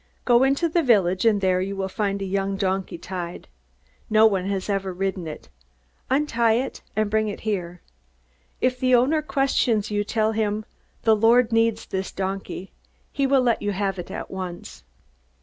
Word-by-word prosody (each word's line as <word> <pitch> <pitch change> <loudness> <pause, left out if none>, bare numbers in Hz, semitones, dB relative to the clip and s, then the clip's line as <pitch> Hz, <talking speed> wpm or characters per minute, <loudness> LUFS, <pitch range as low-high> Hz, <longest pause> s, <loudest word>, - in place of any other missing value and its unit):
"Go 240 -1 +5
into 275 +5 +2
the 335 +1 +1
village, 195 - +3
and 210 -3 +3
there 185 -1 +2
you 195 +1 -3
will 195 0 -2
find 200 0 -2
a - - -2
young 195 0 -1
donkey 190 -2 -1
tied. 175 0 -6 0.6
No 215 0 +5
one 195 -4 +2
has 195 -1 -2
ever 195 -2 -1
ridden 190 -1 -3
it. 155 - -9 0.6
Untie 240 -5 +2
it 255 +3 -3
and 215 0 +1
bring 215 +1 +1
it 205 - -5
here. 180 -5 -3 0.8
If 255 0 0
the 255 -1 +4
owner 275 +6 +3
questions 265 -7 +1
you, 205 0 0
tell 215 +1 0
him, 215 -1 -1 0.4
'The 220 -1 +5
Lord 230 +2 +4
needs 225 -1 +2
this 190 0 -4
donkey.' 190 0 -5 0.4
He 275 -1 0
will 270 -1 +4
let 240 -2 +1
you 205 0 -1
have 195 -1 -2
it 175 - -7
at - - -6
once." 185 - -7
205 Hz, 175 wpm, -24 LUFS, 190-235 Hz, 0.8 s, Go